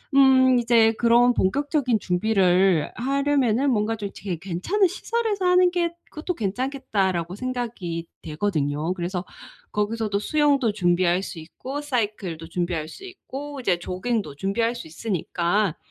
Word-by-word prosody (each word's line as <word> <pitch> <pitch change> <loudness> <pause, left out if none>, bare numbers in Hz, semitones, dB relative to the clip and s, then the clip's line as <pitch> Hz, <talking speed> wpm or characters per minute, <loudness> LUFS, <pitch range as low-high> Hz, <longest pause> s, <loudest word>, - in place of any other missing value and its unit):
음 260 -2 +6
이제 230 -1 +4
그런 240 +2 +4
본격적인 265 - +1
준비를 185 -3 +2
하려면은 275 -1 +1
뭔가 220 0 +1
좀 205 -2 -5
되게 185 -4 -4
괜찮은 200 - +1
시설에서 415 +1 -2
하는 360 0 +5
게 345 -1 0 0.2
'그것도 325 +4 -4
괜찮겠다.'라고 200 - -1
생각이 220 -9 -4 0.2
되거든요. 155 -1 -1
그래서 180 +1 -3 0.5
거기서도 210 0 -1
수영도 280 -1 +2
준비할 175 -1 +2
수 180 - -7
있고 260 - -7
사이클도 205 - -3
준비할 170 -3 -2
수 385 - -11
있고 290 -6 -8
이제 190 -8 +1
조깅도 185 -1 -3
준비할 225 +8 0
수 235 -8 -8
있으니까 175 0 -1
220 Hz, 325 characters per minute, -24 LUFS, 180-265 Hz, 0.5 s, 음